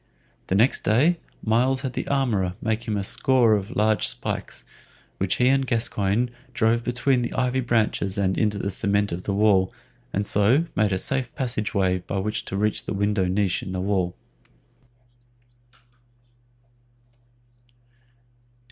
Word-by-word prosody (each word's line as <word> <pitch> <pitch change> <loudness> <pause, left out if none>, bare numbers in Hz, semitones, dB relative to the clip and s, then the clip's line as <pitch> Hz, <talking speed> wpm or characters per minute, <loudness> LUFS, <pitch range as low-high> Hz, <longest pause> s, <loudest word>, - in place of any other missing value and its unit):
The 95 - 0
next 115 +7 +3
day 145 +11 +3 0.3
Myles 125 +4 +2
had 130 -2 -4
the - - -4
armorer 110 -10 0
make 115 +1 -2
him 105 -2 -1
a 100 - -2
score 120 +2 +3
of 105 +3 -2
large 110 0 +2
spikes, - - -3 0.6
which 95 -1 0
he 125 - +2
and 135 +1 +3
Gascoyne 115 0 0 0.2
drove 115 +1 +2
between 125 +1 +1
the 120 - -3
ivy 130 0 0
branches 110 -5 +1
and 95 -2 +1
into 105 -2 0
the 100 0 -2
cement 100 0 0
of 85 +2 -5
the 100 - -1
wall, 100 -3 +3 0.4
and 100 +1 -1
so 110 +11 +3
made 105 -1 +2
a 95 - +1
safe 130 +5 -2
passageway 100 -7 0
by 90 +2 -5
which 105 +3 -2
to 95 - -4
reach 105 +1 0
the - - -3
window 100 -1 +1
niche 95 0 0
in 95 - -6
the 95 - -2
wall. 95 -2 -1
105 Hz, 145 wpm, -24 LUFS, 100-120 Hz, 0.6 s, next